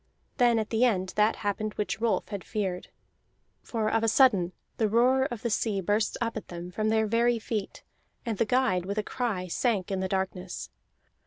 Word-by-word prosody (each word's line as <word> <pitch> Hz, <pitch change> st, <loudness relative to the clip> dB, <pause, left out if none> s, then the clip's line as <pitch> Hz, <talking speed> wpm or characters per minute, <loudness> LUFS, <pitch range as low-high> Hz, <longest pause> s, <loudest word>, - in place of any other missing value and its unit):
Then 240 Hz, -2 st, +4 dB
at 220 Hz, -1 st, -2 dB
the 225 Hz, +1 st, +2 dB
end 190 Hz, -7 st, +2 dB
that 210 Hz, +1 st, +3 dB
happened 210 Hz, +1 st, -1 dB
which 210 Hz, +1 st, -2 dB
Rolf 220 Hz, -5 st, 0 dB
had 200 Hz, -4 st, -5 dB
feared. 195 Hz, -4 st, -3 dB, 0.7 s
For 225 Hz, -2 st, -2 dB
of 225 Hz, +1 st, +1 dB
a -, -, +3 dB
sudden 210 Hz, -8 st, +4 dB, 0.3 s
the 220 Hz, -2 st, +2 dB
roar 255 Hz, +4 st, +4 dB
of 240 Hz, -5 st, -5 dB
the 235 Hz, -, -1 dB
sea 210 Hz, -2 st, 0 dB
burst 205 Hz, +4 st, 0 dB
up 230 Hz, -1 st, -2 dB
at 220 Hz, -, -6 dB
them 175 Hz, 0 st, -7 dB
from 215 Hz, +3 st, -1 dB
their 220 Hz, 0 st, +3 dB
very 235 Hz, +2 st, +2 dB
feet, 220 Hz, -2 st, -4 dB, 0.4 s
and 225 Hz, -4 st, -3 dB
the 230 Hz, -, +3 dB
guide, 245 Hz, -6 st, +2 dB
with 200 Hz, +2 st, -3 dB
a 215 Hz, -, +1 dB
cry, 215 Hz, -6 st, -2 dB
sank 200 Hz, +1 st, 0 dB
in 190 Hz, -, -1 dB
the 190 Hz, -, -1 dB
darkness. 190 Hz, -1 st, -3 dB
215 Hz, 195 wpm, -28 LUFS, 195-230 Hz, 0.7 s, Then